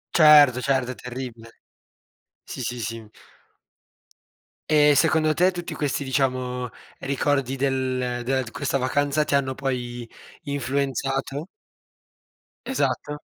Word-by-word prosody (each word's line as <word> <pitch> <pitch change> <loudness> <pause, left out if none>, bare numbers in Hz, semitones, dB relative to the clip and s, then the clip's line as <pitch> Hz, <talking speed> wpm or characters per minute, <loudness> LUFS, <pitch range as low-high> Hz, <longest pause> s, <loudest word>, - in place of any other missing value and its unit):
Certo, 150 -5 +7
certo, 130 -2 0
è - - -7
terribile. 120 -2 -8 0.8
Sì, - - -8
sì, 120 0 -3
sì. 115 0 -5 1.7
E 150 -1 +5
secondo 155 0 +3
te, 180 +4 +3
tutti 175 -1 -6
questi 140 -1 -2
diciamo, 125 -2 -1 0.3
ricordi 135 -1 0
del 130 -1 0
ehm, 125 -1 -2
dela 130 +1 0
d 115 - -9
questa 140 -1 -1
vacanza, 145 +3 +1
ti 140 - +1
hanno 130 -1 0
poi 120 -3 -4 0.3
influenzato? 140 +1 -2 1.2
Esatto. 145 - -1
135 Hz, 110 wpm, -24 LUFS, 125-145 Hz, 1.7 s, Certo